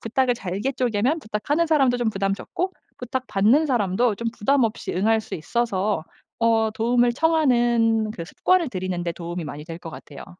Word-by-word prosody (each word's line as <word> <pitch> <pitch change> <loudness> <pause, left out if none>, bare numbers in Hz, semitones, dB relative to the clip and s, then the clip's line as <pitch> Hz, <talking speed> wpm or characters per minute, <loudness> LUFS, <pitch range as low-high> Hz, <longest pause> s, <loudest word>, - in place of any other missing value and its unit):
부탁을 250 +3 +1
잘게 205 +4 -3
쪼개면 250 +3 0
부탁하는 285 +7 -1
사람도 275 -6 +3
좀 240 -2 +1
부담 195 -1 -1
적고 365 - -4 0.2
부탁 255 +1 -4
받는 225 +11 +3
사람도 235 -3 +1
좀 230 +3 -2
부담 270 +4 +2
없이 220 -1 -3
응할 220 +4 +2
수 - - -8
있어서 205 0 -1 0.4
어 225 -1 +2
도움을 240 +2 +2
청하는 240 -7 +2
그 170 - -6
습관을 350 - +1
들이는 185 -3 -3
데 170 - -1
도움이 170 0 -5
많이 150 0 -7
될 165 0 -8
것 165 -2 -9
같아요. 145 -3 -10
225 Hz, 365 characters per minute, -23 LUFS, 195-255 Hz, 0.4 s, 사람도